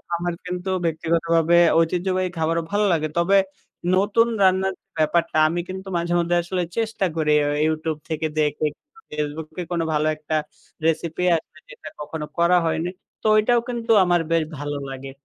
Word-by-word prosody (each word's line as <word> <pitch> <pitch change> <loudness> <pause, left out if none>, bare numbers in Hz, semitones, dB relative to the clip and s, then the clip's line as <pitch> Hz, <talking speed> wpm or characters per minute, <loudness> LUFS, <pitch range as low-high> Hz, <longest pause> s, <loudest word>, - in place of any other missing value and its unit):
আমার 175 +1 -2
কিন্তু 180 +1 -4 0.2
ব্যক্তিগতভাবে 165 +1 +2 0.2
ঐতিহ্যবাহী 185 +2 0
খাবারও 165 +1 0
ভালো 205 +1 +2
লাগে 155 -1 0
তবে, 190 +3 +4 0.6
নতুন 205 +4 +3
রান্নার 190 0 +3 0.2
ব্যাপারটা 155 +1 +1
আমি 170 +2 -1
কিন্তু 190 +1 -6
মাঝে 170 0 -1
মধ্যে 175 0 +1
আসলে 180 +1 -2 0.2
চেষ্টা 225 -3 0
করি 155 -2 +1
আ - - 0 0.2
ইউটিউব 155 0 -1
থেকে 160 0 -1
দেখে। 150 0 +1 0.5
ফেসবুককে 150 +3 -4
কোন 170 -1 0
ভালো 150 +1 +1
একটা 155 +1 -4 0.5
রেসিপি 165 +2 0
আসবে 160 - -7
যেটা 475 -4 -10
কখনো 150 +1 -5
করা 170 +1 +4
হয়নি। 165 +1 -1 0.3
তো - - -1
ওইটাও 235 +3 +4
কিন্তু 235 -1 -2
আমার 175 -1 +3
বেশ 165 -1 +3
ভালো 145 +1 -4
লাগে। 135 0 -7
170 Hz, 155 wpm, -23 LUFS, 155-185 Hz, 0.6 s, তবে